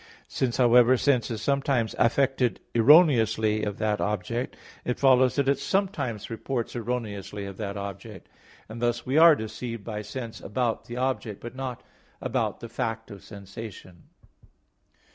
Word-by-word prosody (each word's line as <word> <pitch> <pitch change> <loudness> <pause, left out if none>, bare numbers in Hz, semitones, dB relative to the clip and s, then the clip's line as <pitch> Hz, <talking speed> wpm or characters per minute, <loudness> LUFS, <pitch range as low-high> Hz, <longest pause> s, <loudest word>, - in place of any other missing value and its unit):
Since, 125 -3 -1
however, 125 0 +6
sense 125 -4 +2
is 115 -3 -4
sometimes 135 -5 +1
affected 130 0 +2
erroneously 110 -6 +5
of 105 -1 -3
that 105 -1 0
object, 105 +4 -2 0.3
it 125 - -2
follows 130 -2 +4
that 140 -2 +1
it 140 - +2
sometimes 185 - -2
reports 120 +2 -3
erroneously 105 -4 -4
of 100 -1 -8
that 100 -1 -4
object; 100 -1 -8 0.4
and 115 +2 -8
thus 120 0 0
we 135 +5 +2
are 165 -1 +8
deceived 115 -1 -6
by 105 -1 -5
sense 115 +2 -7
about 115 +2 -2
the 120 - -7
object, 125 -5 -2
but 120 - -8
not 130 -2 -5 0.4
about - - -2
the 115 - -6
fact 115 -1 -4
of 100 -2 -11
sensation. 100 -3 -10
115 Hz, 145 wpm, -26 LUFS, 105-130 Hz, 0.4 s, are